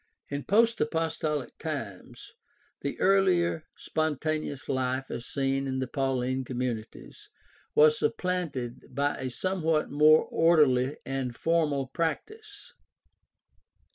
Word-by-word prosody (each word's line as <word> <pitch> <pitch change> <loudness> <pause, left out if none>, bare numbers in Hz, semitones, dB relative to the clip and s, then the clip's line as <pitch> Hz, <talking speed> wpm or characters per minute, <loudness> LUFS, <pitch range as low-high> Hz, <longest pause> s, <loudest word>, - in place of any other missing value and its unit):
— - - -44
In 140 - -5
post 230 +3 +3
apostolic 155 -3 -2
times 140 - -6 0.5
the 140 - -4
earlier 180 -4 +2
spontaneous 155 -3 -2
life 130 0 -1
as 120 - -6
seen 135 0 -1
in 130 0 -2
the 130 - -1
Pauline 130 -1 -1
communities 125 -3 -5 0.5
was 155 0 +6
supplanted 145 -8 -2
by 145 +1 +1
a 130 -1 -3
somewhat 165 +1 0
more 155 +2 +6
orderly 145 -5 +3
and 130 -2 -3
formal 155 -4 +1
practice. 410 - -5
145 Hz, 110 wpm, -28 LUFS, 130-165 Hz, 0.5 s, was